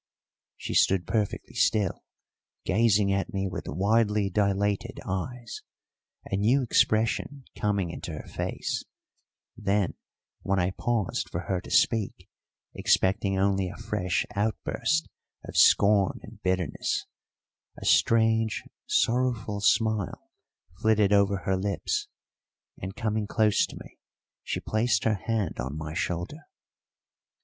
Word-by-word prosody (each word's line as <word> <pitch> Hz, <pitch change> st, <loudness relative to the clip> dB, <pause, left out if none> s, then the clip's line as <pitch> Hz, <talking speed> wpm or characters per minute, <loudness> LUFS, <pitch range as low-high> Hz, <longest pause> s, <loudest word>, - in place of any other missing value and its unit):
She -, -, -5 dB
stood 95 Hz, -3 st, +3 dB
perfectly 105 Hz, 0 st, -2 dB
still, 105 Hz, -4 st, +1 dB, 0.6 s
gazing 100 Hz, -1 st, +3 dB
at 100 Hz, 0 st, -1 dB
me 95 Hz, 0 st, -1 dB
with 95 Hz, 0 st, -6 dB
widely 105 Hz, -, +1 dB
dilated 100 Hz, +1 st, 0 dB
eyes, 115 Hz, +6 st, -4 dB, 0.6 s
a 95 Hz, -, -2 dB
new 120 Hz, +7 st, +3 dB
expression 115 Hz, +4 st, +1 dB
coming 100 Hz, -4 st, 0 dB
into 85 Hz, -, -6 dB
her 75 Hz, -, -8 dB
face; -, -, -3 dB, 0.7 s
then 100 Hz, -3 st, 0 dB, 0.5 s
when 95 Hz, 0 st, 0 dB
I 90 Hz, 0 st, +1 dB
paused 110 Hz, -1 st, -1 dB
for 85 Hz, -, -3 dB
her 90 Hz, 0 st, -2 dB
to -, -, -11 dB
speak, 110 Hz, -4 st, +1 dB, 0.5 s
expecting 95 Hz, +1 st, +2 dB
only 95 Hz, -1 st, +1 dB
a 95 Hz, -, -9 dB
fresh 105 Hz, -5 st, -1 dB
outburst 110 Hz, +9 st, 0 dB, 0.4 s
of -, -, -9 dB
scorn 100 Hz, -2 st, +5 dB
and -, -, -13 dB
bitterness, 90 Hz, -4 st, -1 dB, 0.7 s
a -, -, -8 dB
strange, 115 Hz, -1 st, +3 dB, 0.2 s
sorrowful 115 Hz, -4 st, +1 dB
smile 110 Hz, -1 st, +1 dB, 0.5 s
flitted 105 Hz, -2 st, +3 dB
over 100 Hz, -1 st, +3 dB
her 95 Hz, -, +2 dB
lips, 100 Hz, 0 st, -1 dB, 0.7 s
and, 95 Hz, +1 st, -5 dB
coming 110 Hz, -2 st, -1 dB
close 110 Hz, -1 st, +2 dB
to -, -, -11 dB
me, -, -, -14 dB, 0.4 s
she -, -, -3 dB
placed 110 Hz, 0 st, +1 dB
her 110 Hz, -, +3 dB
hand 110 Hz, -7 st, -1 dB
on 65 Hz, +4 st, -3 dB
my 80 Hz, 0 st, -5 dB
shoulder. 90 Hz, -, -3 dB
100 Hz, 120 wpm, -27 LUFS, 95-110 Hz, 0.7 s, scorn